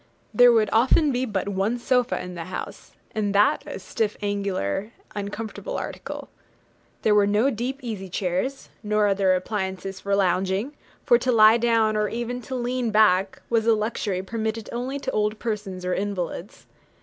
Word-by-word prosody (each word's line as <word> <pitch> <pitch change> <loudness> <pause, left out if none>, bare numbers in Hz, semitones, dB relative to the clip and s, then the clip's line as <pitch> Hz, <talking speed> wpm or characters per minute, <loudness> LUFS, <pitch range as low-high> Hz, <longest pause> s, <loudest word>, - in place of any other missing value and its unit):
There 245 0 +7
would 220 -2 +3
often 265 +6 +4
be 255 0 0
but 205 -5 -2
one 200 +4 0
sofa 250 0 +1
in 180 0 -6
the 170 -2 -6
house, 185 - -7 0.2
and 205 -2 -1
that 205 +1 +4
a - - -5
stiff, 210 +2 -2
angular, 200 - -2 0.2
uncomfortable 210 - -5
article. - - -6 0.8
There 215 - +4
were 205 -1 +4
no 215 +7 +3
deep 250 +4 -3
easy 205 -5 -5
chairs, 185 +10 -2
nor 210 -1 +1
other 195 -2 +3
appliances 190 0 -3
for 200 0 0
lounging; 190 +6 +1 0.3
for 240 - +5
to 255 +1 +1
lie 220 -1 +7
down, 225 -2 +2
or 210 -1 +1
even 240 +1 -4
to 260 - -2
lean 245 -1 -1
back, 200 -3 +3
was 230 -1 +1
a 225 - +6
luxury 210 -3 -2
permitted 220 +1 -3
only 255 +4 -3
to 280 - -3
old 210 0 0
persons 205 -5 -4
or 180 - 0
invalids. 195 -1 -4
210 Hz, 165 wpm, -24 LUFS, 195-235 Hz, 0.8 s, There